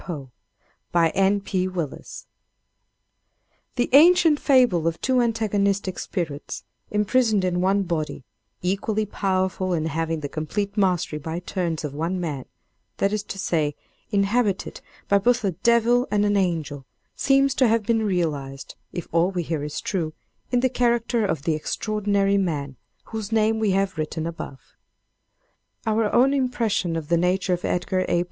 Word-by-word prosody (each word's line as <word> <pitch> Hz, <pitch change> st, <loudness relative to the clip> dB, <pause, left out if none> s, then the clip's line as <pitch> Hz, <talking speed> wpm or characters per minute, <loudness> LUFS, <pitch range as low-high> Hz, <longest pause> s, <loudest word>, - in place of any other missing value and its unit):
POE 140 Hz, -7 st, -7 dB, 0.6 s
By 170 Hz, -1 st, +4 dB
N. 195 Hz, +3 st, +2 dB
P. 185 Hz, -1 st, -1 dB
Willis 170 Hz, -6 st, -5 dB, 1.5 s
The 245 Hz, -1 st, +1 dB
ancient 325 Hz, 0 st, +6 dB
fable 245 Hz, -, +3 dB
of 165 Hz, 0 st, -1 dB
two 255 Hz, -1 st, +2 dB
antagonistic 200 Hz, -4 st, 0 dB
spirits 155 Hz, -7 st, -4 dB, 0.3 s
imprisoned 210 Hz, -1 st, +2 dB
in 180 Hz, -1 st, 0 dB
one 195 Hz, +2 st, +2 dB
body, 160 Hz, -6 st, -3 dB, 0.4 s
equally 205 Hz, +4 st, 0 dB
powerful 185 Hz, -2 st, -1 dB
and 160 Hz, -2 st, 0 dB
having 160 Hz, 0 st, -2 dB
the 145 Hz, -, -3 dB
complete 200 Hz, +8 st, -3 dB
mastery 180 Hz, -6 st, +1 dB
by 160 Hz, +2 st, -4 dB
turns 175 Hz, -2 st, -3 dB
of 145 Hz, -2 st, -4 dB
one 165 Hz, +5 st, -2 dB
man, 150 Hz, -7 st, -4 dB, 0.5 s
that 200 Hz, +1 st, +1 dB
is 215 Hz, -, 0 dB
to -, -, -6 dB
say, 155 Hz, -6 st, 0 dB, 0.3 s
inhabited 200 Hz, 0 st, 0 dB, 0.3 s
by 200 Hz, -, +4 dB
both 245 Hz, +3 st, +2 dB
a 195 Hz, -, +1 dB
devil 235 Hz, +6 st, +3 dB
and 210 Hz, 0 st, +2 dB
an 205 Hz, 0 st, +2 dB
angel 160 Hz, -8 st, -1 dB, 0.3 s
seems 275 Hz, 0 st, +3 dB
to 260 Hz, -2 st, +3 dB
have 225 Hz, 0 st, +2 dB
been 225 Hz, +1 st, +1 dB
realized, 150 Hz, -9 st, -2 dB, 0.2 s
if 175 Hz, -, -5 dB
all 170 Hz, +2 st, +3 dB
we 180 Hz, -3 st, -2 dB
hear 160 Hz, -2 st, -3 dB
is 150 Hz, 0 st, -4 dB
true, 165 Hz, -5 st, -2 dB, 0.4 s
in 245 Hz, -1 st, +2 dB
the 260 Hz, -, +4 dB
character 235 Hz, -1 st, +1 dB
of 150 Hz, -7 st, -2 dB
the 165 Hz, -, +1 dB
extraordinary 200 Hz, +4 st, 0 dB
man 145 Hz, -7 st, -2 dB, 0.3 s
whose 220 Hz, -1 st, -6 dB
name 220 Hz, 0 st, +2 dB
we 220 Hz, -2 st, +1 dB
have 190 Hz, -3 st, 0 dB
written 155 Hz, +1 st, -3 dB
above. 165 Hz, -5 st, -8 dB, 1.1 s
Our 220 Hz, -1 st, +1 dB
own 260 Hz, +3 st, +4 dB
impression 235 Hz, -10 st, 0 dB
of 160 Hz, -2 st, -4 dB
the 170 Hz, -, +3 dB
nature 180 Hz, +2 st, +1 dB
of 175 Hz, -, -3 dB
Edgar 185 Hz, +1 st, 0 dB
A. 175 Hz, -, +2 dB
190 Hz, 155 wpm, -24 LUFS, 165-220 Hz, 1.5 s, ancient